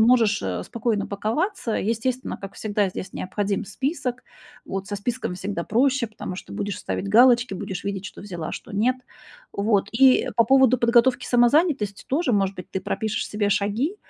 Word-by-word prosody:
можешь, 225 Hz, -2 st, +4 dB
э, 90 Hz, -2 st, -3 dB
спокойно 225 Hz, -3 st, -1 dB
паковаться. 225 Hz, -, -2 dB
Естественно, 235 Hz, +4 st, -1 dB
как 195 Hz, 0 st, -9 dB
всегда, 205 Hz, -2 st, 0 dB
здесь 185 Hz, +1 st, -7 dB
необходим 200 Hz, +2 st, -2 dB
список. 255 Hz, -, -3 dB, 0.4 s
Вот 195 Hz, +1 st, -5 dB
со 205 Hz, -, -3 dB
списком 235 Hz, -2 st, -3 dB
всегда 195 Hz, -2 st, -3 dB
проще, 255 Hz, +2 st, +1 dB
потому 200 Hz, -4 st, -7 dB
что -, -, -9 dB
будешь 205 Hz, -1 st, -3 dB
ставить 195 Hz, -, -4 dB
галочки, 240 Hz, 0 st, +5 dB
будешь 185 Hz, +1 st, -5 dB
видеть, 200 Hz, -1 st, -3 dB
что -, -, -8 dB
взяла, 175 Hz, -5 st, -6 dB
а -, -, -5 dB
что -, -, -8 dB
нет. 240 Hz, +6 st, +2 dB, 0.6 s
Вот, 200 Hz, -1 st, +1 dB
и 260 Hz, +2 st, +5 dB
по 230 Hz, -, +6 dB
поводу 265 Hz, 0 st, +5 dB
подготовки 240 Hz, +1 st, +3 dB
самозанятости 245 Hz, -, +2 dB
тоже, 280 Hz, -2 st, +1 dB
может 195 Hz, -1 st, +1 dB
быть, 180 Hz, -, -8 dB
ты 190 Hz, -, -3 dB
пропишешь 215 Hz, +3 st, -2 dB
себе 210 Hz, -1 st, 0 dB
шаги. 210 Hz, -, 0 dB
215 Hz, 170 wpm, -24 LUFS, 200-250 Hz, 0.6 s, по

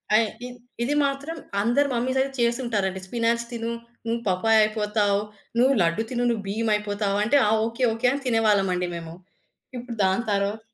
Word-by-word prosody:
ఆ! -, -, +8 dB, 0.3 s
ఇద్ 245 Hz, -, -10 dB, 0.3 s
ఇది 285 Hz, +4 st, 0 dB
మాత్రం 280 Hz, +4 st, -3 dB, 0.2 s
అందరు 245 Hz, +6 st, +2 dB
మమ్మీసయితే 260 Hz, +3 st, 0 dB
చేసుంటారండి. 235 Hz, -6 st, 0 dB
స్పినాచ్ 235 Hz, +1 st, 0 dB
తిను 230 Hz, 0 st, -3 dB, 0.3 s
నువ్వు 230 Hz, +1 st, -1 dB
పపాయ్ 220 Hz, +5 st, +3 dB
అయిపోతావు. 210 Hz, -1 st, +1 dB, 0.4 s
నువ్వు 265 Hz, +2 st, +5 dB
లడ్డు 170 Hz, +6 st, +1 dB
తిను 245 Hz, 0 st, -1 dB
నువ్వు 220 Hz, -4 st, -1 dB
భీమ్ 220 Hz, +3 st, -1 dB
అయిపోతావు. 205 Hz, -1 st, -1 dB
అంటే 275 Hz, +7 st, +3 dB
ఆ! -, -, +2 dB, 0.2 s
ఓకే. 230 Hz, +3 st, -4 dB
ఓకే. 230 Hz, +2 st, 0 dB
అని 280 Hz, 0 st, -4 dB
తినేవాళ్ళమండి 200 Hz, -6 st, +2 dB
మేము. 165 Hz, -1 st, -7 dB, 0.6 s
ఇప్పుడు 240 Hz, -1 st, -6 dB
దాని 190 Hz, +5 st, +2 dB
తరువాత 200 Hz, +2 st, 0 dB
225 Hz, 155 wpm, -24 LUFS, 205-240 Hz, 0.6 s, ఆ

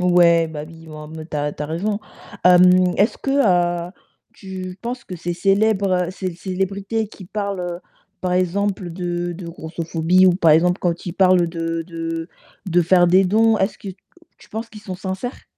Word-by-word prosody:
Ouais, 170 Hz, -2 st, +4 dB
bah, 150 Hz, -1 st, -6 dB
oui, 165 Hz, 0 st, -14 dB
en 155 Hz, 0 st, -9 dB
mode 160 Hz, +1 st, -9 dB
tu -, -, -3 dB
as 145 Hz, 0 st, -1 dB
r -, -, -12 dB
tu 150 Hz, -, -6 dB
as -, -, -3 dB
raison. 200 Hz, +7 st, -2 dB, 0.4 s
Hem, 180 Hz, 0 st, +6 dB
est-ce 205 Hz, +4 st, +2 dB
que, 270 Hz, -, -4 dB, 0.6 s
heu, -, -, -21 dB, 0.4 s
tu 185 Hz, -1 st, -8 dB
penses 240 Hz, +1 st, -5 dB
que 185 Hz, -, -7 dB
ces 175 Hz, +1 st, -4 dB
célébr 195 Hz, -1 st, +2 dB
ces 185 Hz, -2 st, -5 dB
célébrités 195 Hz, +4 st, -2 dB
qui 200 Hz, -2 st, -13 dB
parlent, 200 Hz, 0 st, -3 dB
heu, 175 Hz, -1 st, -4 dB, 0.4 s
par 180 Hz, -1 st, -1 dB
exemple 185 Hz, 0 st, 0 dB
de 175 Hz, 0 st, -3 dB
de 170 Hz, 0 st, -8 dB
grossophobie 165 Hz, +2 st, +1 dB
ou 180 Hz, -, +6 dB
par 170 Hz, -3 st, +3 dB
exemple 175 Hz, +4 st, +4 dB
quand 175 Hz, 0 st, -2 dB
ils 170 Hz, -, -3 dB
parlent 185 Hz, -2 st, +4 dB
de 165 Hz, 0 st, -3 dB
de 165 Hz, 0 st, -5 dB, 0.4 s
de 175 Hz, -1 st, +3 dB
faire 175 Hz, +1 st, +4 dB
des 185 Hz, +2 st, +5 dB
dons, 220 Hz, +4 st, +3 dB
est-ce 195 Hz, +2 st, -1 dB
que 200 Hz, -, -8 dB, 0.5 s
tu -, -, -19 dB
penses 225 Hz, +2 st, -5 dB
qu'ils 215 Hz, -, -12 dB
sont 185 Hz, -3 st, -6 dB
sincères? 190 Hz, +6 st, -5 dB
180 Hz, 190 wpm, -21 LUFS, 170-195 Hz, 0.6 s, Hem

